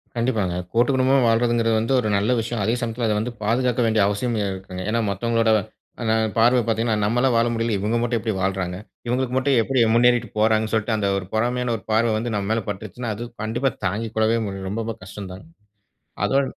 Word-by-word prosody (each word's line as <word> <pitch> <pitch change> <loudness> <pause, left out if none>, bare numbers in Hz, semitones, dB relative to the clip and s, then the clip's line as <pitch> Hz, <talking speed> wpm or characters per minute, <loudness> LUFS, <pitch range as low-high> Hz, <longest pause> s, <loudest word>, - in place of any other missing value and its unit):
கண்டிப்பாங்க. 110 -7 0 0.2
கூட்டு 120 +2 +3
குடும்பமா 130 +1 +3
வால்றதுங்கறது 115 0 +2
வந்து 115 +4 0
ஒரு 110 - -2
நல்ல 105 +5 +1
விஷயம். 115 -1 -3
அதே 110 +4 +1
சமயத்துல 115 0 -2
அத 105 - +1
வந்து 120 +3 -3
பாதுகாக்க 125 +2 +1
வேண்டிய 110 -1 +2
அவசியம் 115 +4 -1 0.2
இருக்குங்க. 95 -1 -7
ஏன்னா 115 - +1
மத்தவங்களோட 115 +3 +1 0.5
அ - - -3 0.3
பார்வ 120 +3 +5
பாத்தீங்கன்னா, 115 0 +1
"நம்மளால 120 +5 +2
வாழ 115 +1 +3
முடியல 115 -1 0
இவங்க 110 +4 0
மட்டும் 120 -1 0
எப்டி 110 -1 -2
வாழ்றாங்க? 95 -1 -1 0.3
இவங்களுக்கு 125 +1 -1
மட்டும் 135 0 +2
எப்டி 130 +3 0
முன்னேறிட்டு 120 0 +4
போறாங்க"னு 110 0 +2
சொல்ட்டு 110 0 +1
அந்த 100 -1 0
ஒரு 95 - -4
பொறாமையான 120 +2 0
ஒரு 105 - -15
பார்வ 115 +1 +3
வந்து 115 0 -3
நம்ம 100 0 -2
மேல 115 0 +1
பட்ருச்சுன்னா, 110 +3 -5
அது 115 - -6 0.2
கண்டிப்பா 120 +5 0 0.2
தாங்கிக்கொள்ளவே 110 +3 0 0.3
ரொம்ப 115 +1 -3
கஷ்டம் 95 0 -8
தான்ங்க. 95 +12 -12 0.8
அதோட 135 +1 +2
115 Hz, 180 wpm, -22 LUFS, 105-120 Hz, 0.8 s, பார்வ